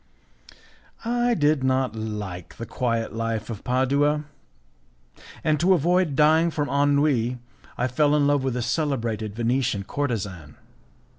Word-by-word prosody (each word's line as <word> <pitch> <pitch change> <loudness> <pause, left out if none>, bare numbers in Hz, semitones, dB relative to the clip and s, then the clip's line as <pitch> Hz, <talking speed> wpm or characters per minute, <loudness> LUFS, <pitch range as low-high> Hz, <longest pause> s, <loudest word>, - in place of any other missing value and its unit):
I 240 +1 +1
did 150 -5 +2
not 130 -3 +1
like 105 -5 -6
the 115 - -5
quiet 115 -2 -2
life 115 -1 -3
of 105 - -7
Padua, 140 +4 +1 1.2
and 155 -1 +2
to 185 +4 +4
avoid 175 -1 +1
dying 160 +3 +4
from 145 -3 -2
ennui 140 -4 +2 0.4
I 125 - 0
fell 145 +4 +2
in 145 -1 +3
love 145 -1 +2
with 130 -2 -1
a 120 - -1
celebrated 115 -7 -2
Venetian 120 -2 0
courtezan. 100 - -4
130 Hz, 130 wpm, -24 LUFS, 115-150 Hz, 1.2 s, to